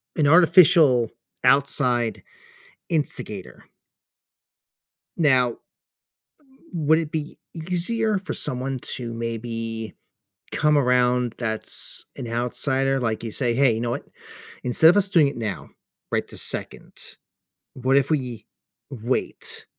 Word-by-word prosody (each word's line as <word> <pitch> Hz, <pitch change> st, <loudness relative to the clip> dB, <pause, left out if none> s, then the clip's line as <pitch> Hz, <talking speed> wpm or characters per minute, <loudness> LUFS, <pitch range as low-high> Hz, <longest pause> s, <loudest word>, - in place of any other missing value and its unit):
a -, -, -8 dB
an 150 Hz, -, +4 dB
artificial, 160 Hz, -, +6 dB, 0.3 s
outside 125 Hz, -3 st, +2 dB, 0.7 s
instigator. 110 Hz, -, -4 dB, 1.5 s
Now, 130 Hz, -7 st, +3 dB, 1.2 s
would 160 Hz, -2 st, +2 dB
it 160 Hz, -2 st, -3 dB
be 155 Hz, -1 st, -4 dB, 0.2 s
easier 185 Hz, +6 st, -1 dB
for 185 Hz, -1 st, -6 dB
someone 130 Hz, +1 st, -2 dB
to 120 Hz, -2 st, -4 dB
maybe 115 Hz, -1 st, -5 dB, 0.6 s
come 150 Hz, -1 st, +2 dB
around 125 Hz, -3 st, +2 dB
that's 110 Hz, -2 st, -2 dB
an 120 Hz, -, -6 dB
outsider? 135 Hz, +3 st, 0 dB
Like, 115 Hz, -2 st, -2 dB
you 115 Hz, -, -4 dB
say, 120 Hz, +1 st, 0 dB
"Hey, 135 Hz, -1 st, +4 dB
you 110 Hz, -, -3 dB
know 120 Hz, 0 st, -2 dB
what? -, -, -4 dB, 0.6 s
Instead 140 Hz, +6 st, +6 dB
of 180 Hz, -, +2 dB
us 200 Hz, -1 st, +3 dB
doing 160 Hz, -6 st, +4 dB
it 140 Hz, -, -6 dB
now, 105 Hz, -6 st, -4 dB, 0.4 s
right -, -, 0 dB
this -, -, -6 dB
second, -, -, -6 dB, 0.8 s
what 130 Hz, +1 st, 0 dB
if 140 Hz, +2 st, +1 dB
we 125 Hz, -7 st, -2 dB, 0.4 s
wait 125 Hz, -2 st, -3 dB
130 Hz, 120 wpm, -23 LUFS, 115-155 Hz, 1.5 s, artificial